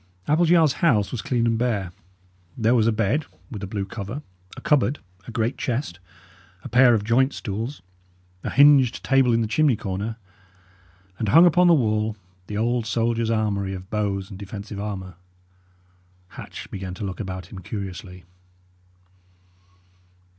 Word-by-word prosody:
Appleyard's 160 -1 +4
house 110 - +3
was 120 - -3
clean 120 0 0
and 115 -1 +1
bare. 105 -7 -1 0.7
There 115 0 +2
was 115 -3 +3
a - - +4
bed, 115 +8 0 0.2
with 105 -5 -6
a 100 - -4
blue 100 0 -3
cover, 105 +7 -6 0.3
a - - -8
cupboard, 145 -1 +2 0.3
a - - -7
great 115 +3 -1
chest, 120 - -3 0.6
a - - -7
pair 125 0 +6
of 105 - -1
joint 130 +5 +2
stools, 115 +7 -5 0.6
a - - -2
hinged 140 -3 +5
table 135 -3 +3
in 115 0 +2
the 110 - 0
chimney 145 +3 +3
corner, 100 +3 -4 1.0
and 110 - -1
hung 165 - +7
upon 180 +1 +5
the 170 - +7
wall 110 -4 0 0.3
the 105 - -4
old 120 +1 0
soldier's 115 +1 0
armoury 100 -3 -1
of 95 +1 -10
bows 100 -2 -2
and 95 - -9
defensive 100 0 -7
armour. 95 -4 -6 1.1
Hatch - - -10
began 95 -2 -6
to 100 - -7
look 95 -2 -5
about 95 -3 -6
him 95 - -8
curiously. 95 -1 -7
110 Hz, 155 wpm, -23 LUFS, 100-125 Hz, 1.1 s, hung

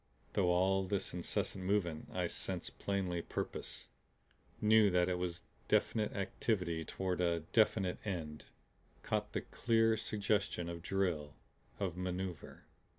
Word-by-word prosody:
Through 95 -3 +3
all 95 +2 +3
this 100 0 -1
incessant 90 +2 -2
movement 90 -5 0
I - - 0
sensed - - -4
plainly 95 -3 0
purpose, - - -4 0.7
knew 110 -1 +6
that 90 -1 +3
it 90 -1 0
was 90 -1 -3 0.2
definite 110 +3 +2
activity 95 -5 -1
toward 90 +1 -2
a 85 -1 +2
definite 105 -4 +3
end, 80 -7 -4 0.6
caught - - -1
the - - 0
clear 115 -1 +3
suggestion 100 -4 0
of 85 -1 -5
drill, 85 -6 -1 0.4
of 90 -4 -2
maneuver. 90 -3 -4
90 Hz, 125 wpm, -36 LUFS, 85-100 Hz, 0.7 s, knew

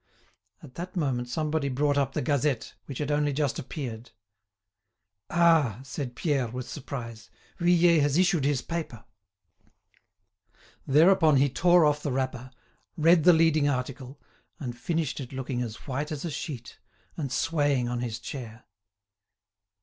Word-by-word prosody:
At 135 -5 -12
that 180 +4 -7
moment 130 -7 -1
somebody 155 +1 -1
brought 145 +2 +1
up 135 -1 0
the - - -2
"Gazette," 140 -2 0
which 135 - -6
had 150 -1 -2
only 145 0 +1
just 140 -1 -1
appeared. 125 -5 -6 1.2
"Ah!" 165 - +3
said 125 -1 -6
Pierre, 140 -5 0
with 125 +2 -6
surprise. 115 -5 -7 0.3
"Vuillet 175 -1 +4
has 145 +1 +2
issued 180 -4 +3
his 140 -2 +1
paper!" 160 -10 -5 1.8
Thereupon 160 +2 +5
he 135 0 +3
tore 175 +3 +4
off 150 0 +2
the 145 - -2
wrapper, 130 -1 -3 0.5
read 165 0 +4
the 180 - +9
leading 160 -3 +3
article, 130 +1 -4 0.4
and 125 -4 -5
finished 160 +2 -2
it 135 -1 -7
looking 130 -1 -3
as 115 -3 -4
white 145 +3 -3
as 150 +1 -4
a 165 - -3
sheet, 125 -7 -7 0.4
and 140 -6 -4
swaying 145 -4 +1
on 120 0 -2
his 120 -2 -3
chair. 120 -4 -8
140 Hz, 140 wpm, -27 LUFS, 125-155 Hz, 1.8 s, the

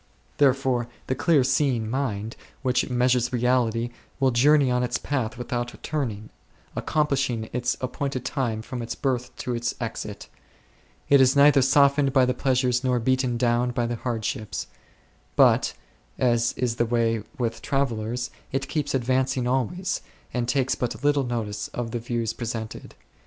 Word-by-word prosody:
Therefore 130 -3 +2 0.2
the - - 0
clear 145 +1 +3
seeing 130 -3 +1
mind 115 -3 -2 0.3
which 125 -1 +1
measures 125 -1 +2
reality 120 -1 +1 0.3
will 135 -1 +3
journey 140 +2 +4
on 125 0 +2
its 125 0 0
path 130 -4 -2
without 120 0 -3
turning, 115 -9 -3 0.4
accomplishing 135 -7 0
its 125 0 0
appointed 130 0 -3
time 115 -5 -2
from 125 0 -5
its 115 - -4
birth 125 -2 -1
to 125 - -3
its 120 0 -2
exit; 115 -3 -5 0.8
it 140 -1 +6
is 130 +1 +5
neither 140 0 +6
softened 140 +1 +4
by 130 -2 +5
the 125 - +1
pleasures 125 -1 +1
nor 125 -1 +2
beaten 130 0 +1
down 120 +1 +2
by 120 -1 -1
the 120 0 -2
hardships; 115 -2 -3 0.7
but, - - +4 0.4
as 120 -2 +2
is 120 -2 -1
the 120 - +2
way 115 -1 +1 0.2
with 115 -3 -2
travellers, 120 -2 -1 0.2
it 135 0 -2
keeps 150 -3 -1
advancing 130 0 +1
always, 135 - -1 0.3
and 120 -1 -1
takes 130 0 +1
but 125 +1 -3
little 145 -2 +3
notice 110 -4 -3
of 120 -2 -3
the 120 - -2
views 115 -1 -2
presented. 115 -2 -6
125 Hz, 150 wpm, -25 LUFS, 120-135 Hz, 0.8 s, it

